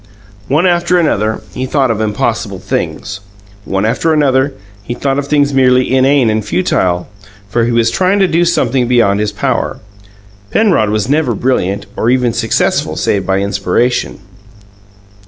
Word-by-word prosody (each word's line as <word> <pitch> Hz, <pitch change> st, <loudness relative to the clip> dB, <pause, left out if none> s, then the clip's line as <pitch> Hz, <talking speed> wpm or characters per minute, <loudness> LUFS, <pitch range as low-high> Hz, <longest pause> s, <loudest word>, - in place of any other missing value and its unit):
One 150 Hz, +6 st, +2 dB
after 175 Hz, 0 st, +2 dB
another, 110 Hz, -, 0 dB
he 130 Hz, +1 st, -3 dB
thought 135 Hz, -2 st, +1 dB
of 110 Hz, -1 st, -2 dB
impossible 110 Hz, -1 st, -2 dB
things; 100 Hz, +2 st, -4 dB, 0.5 s
one 95 Hz, +1 st, -1 dB
after 140 Hz, +9 st, 0 dB
another, 140 Hz, -2 st, +2 dB, 0.3 s
he 120 Hz, +4 st, -5 dB
thought 135 Hz, +1 st, -1 dB
of 140 Hz, -, -4 dB
things 145 Hz, -1 st, +2 dB
merely 130 Hz, -1 st, +3 dB
inane 135 Hz, -1 st, +3 dB
and 110 Hz, 0 st, -1 dB
futile, 90 Hz, -1 st, 0 dB, 0.4 s
for 115 Hz, +3 st, 0 dB
he 120 Hz, -, -1 dB
was 115 Hz, -1 st, +2 dB
trying 190 Hz, +2 st, +1 dB
to 195 Hz, -1 st, +3 dB
do 170 Hz, 0 st, +2 dB
something 135 Hz, -7 st, +1 dB
beyond 115 Hz, -5 st, +2 dB
his 105 Hz, 0 st, -1 dB
power. 105 Hz, -, -2 dB, 0.7 s
Penrod 180 Hz, -, +2 dB
was 105 Hz, 0 st, -1 dB
never 140 Hz, -4 st, +1 dB
brilliant, 100 Hz, -4 st, -1 dB
or 115 Hz, -, 0 dB
even 125 Hz, -2 st, +2 dB
successful, -, -, 0 dB
save 100 Hz, -2 st, -1 dB
by 95 Hz, 0 st, +1 dB
inspiration. 100 Hz, +5 st, -1 dB
120 Hz, 155 wpm, -13 LUFS, 105-140 Hz, 0.7 s, merely